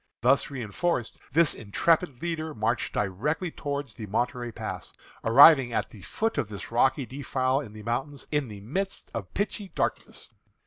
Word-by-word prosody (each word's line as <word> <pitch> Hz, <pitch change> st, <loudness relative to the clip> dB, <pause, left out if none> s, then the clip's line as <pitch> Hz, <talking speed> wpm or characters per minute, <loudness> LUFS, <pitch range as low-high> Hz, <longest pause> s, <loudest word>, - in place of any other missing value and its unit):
Thus 130 Hz, +3 st, +4 dB
reënforced, 130 Hz, -, -2 dB
this 165 Hz, 0 st, +4 dB
intrepid 140 Hz, -, +1 dB
leader 160 Hz, -2 st, -3 dB
marched 110 Hz, +2 st, 0 dB
directly 130 Hz, -, -1 dB
toward 145 Hz, -1 st, -3 dB
the 110 Hz, -1 st, -8 dB
Monterey 120 Hz, +3 st, -1 dB
Pass, -, -, -6 dB, 0.3 s
arriving 135 Hz, +1 st, +8 dB
at -, -, -1 dB
the 105 Hz, -, -12 dB
foot 225 Hz, -, -1 dB
of 105 Hz, -, -2 dB
this 100 Hz, +1 st, -8 dB
rocky 130 Hz, +3 st, +3 dB
defile 130 Hz, +1 st, 0 dB
in 120 Hz, -8 st, -8 dB
the 110 Hz, 0 st, -10 dB
mountains 135 Hz, +5 st, -3 dB
in 150 Hz, -3 st, +1 dB
the 105 Hz, -3 st, -9 dB
midst 190 Hz, -, -4 dB
of 100 Hz, -5 st, -5 dB
pitchy 205 Hz, -1 st, -2 dB
darkness. -, -, -3 dB
130 Hz, 160 wpm, -27 LUFS, 115-150 Hz, 0.3 s, arriving